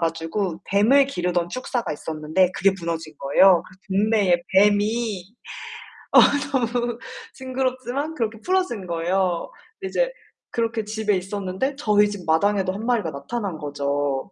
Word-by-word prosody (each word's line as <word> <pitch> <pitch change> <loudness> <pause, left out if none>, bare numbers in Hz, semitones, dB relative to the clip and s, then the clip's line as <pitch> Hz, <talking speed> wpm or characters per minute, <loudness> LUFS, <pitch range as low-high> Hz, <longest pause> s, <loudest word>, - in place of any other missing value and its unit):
가지고 165 +2 -2
뱀을 235 +8 +5
기르던 175 -8 -1
축사가 250 +3 -3
있었는데 160 +4 0
그게 195 +1 +3
무너진 165 -2 -4
거예요. 175 +6 +5 0.2
그 195 - -4
동네에 200 -5 +3 0.2
뱀이 210 0 +2 0.9
어 - - +9 0.3
너무 240 -2 0 0.4
징그럽지만 260 +3 -3
그렇게 225 -4 -2
풀어진 365 - 0
거예요. 175 +1 0 0.3
이제 - - 0 0.4
그렇게 230 -1 -1
집에 215 -1 -1
있었는데 195 +7 -3
저희 210 -6 +3
집 205 -3 -7
마당에도 190 +4 +2
1 210 +4 -6
마리가 230 -9 0
나타난 180 +6 -4
거죠. 145 +1 -2
200 Hz, 300 characters per minute, -23 LUFS, 170-235 Hz, 0.9 s, 어